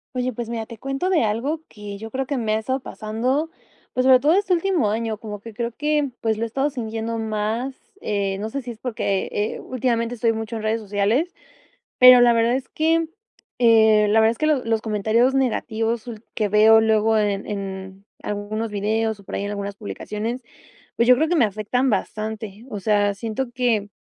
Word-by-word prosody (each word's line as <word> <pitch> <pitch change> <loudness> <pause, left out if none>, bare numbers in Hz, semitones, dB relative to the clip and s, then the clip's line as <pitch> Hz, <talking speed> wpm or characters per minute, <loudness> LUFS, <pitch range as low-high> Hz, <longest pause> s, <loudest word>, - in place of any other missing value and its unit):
Oye, 255 0 -1
pues, 230 0 -5
mira, 230 -1 -3
te 230 -1 -11
cuento 275 +7 -2
de 355 - +3
algo 250 +9 -1
que 205 -1 -9
yo 225 0 -7
creo 265 +3 -2
que 280 +1 -2
me 220 -3 0
ha - - +2
estado 260 +4 -2
pasando, 255 +7 -2 0.4
pues, 255 - +1
sobre 260 -1 +7
todo 295 +5 +3
este 390 0 +2
último 350 - +1
año, 220 0 -2
como 210 -2 -7
que 225 +2 -11
creo 235 +2 -3
que, 295 +2 0
pues, 220 -1 +1
lo - - -1
he - - -3
estado 270 +6 -1
sintiendo 225 -2 -4
más, 220 +4 -2 0.3
eh, 200 -2 -1
no 215 +2 -3
sé 275 +3 -4
si 240 - -6
es 225 - -12
porque, 220 -6 -2
eh, 210 +1 -2
últimamente 245 -2 -1
estoy 230 -1 +1
mucho 225 +1 -5
en 220 - -5
redes 220 +1 0
sociales, 210 - 0 0.6
pero 250 -1 +9
la 240 -1 +6
verdad 230 +1 +2
es 265 0 -4
que, 325 +1 +1 0.5
eh, 220 -3 +5
la 220 +2 +4
verdad 220 0 +5
es 230 - -5
que 310 - +1
los 295 -5 +1
los 225 -1 0
comentarios 220 +4 +1
negativos 230 -3 -1
ul 230 -2 -8
que 210 -2 0
veo 215 +2 +6
luego 220 0 +3
en 205 -2 0
en 190 -1 -6 0.2
algunos 210 +2 -3
videos 215 +1 -1
o - - -18
por - - -8
ahí 200 - -2
en 205 - -3
algunas 200 -1 -5
publicaciones, 215 +3 -5 0.6
pues, 235 - +3
yo 250 - +8
creo 310 +5 +1
que 350 - +2
me 250 - +5
afectan 215 +6 -1
bastante, 215 +1 -3
o 205 -4 -5
sea, 205 -1 +2
siento 225 +5 -3
que 235 -5 +1
225 Hz, 205 wpm, -22 LUFS, 210-255 Hz, 0.6 s, pero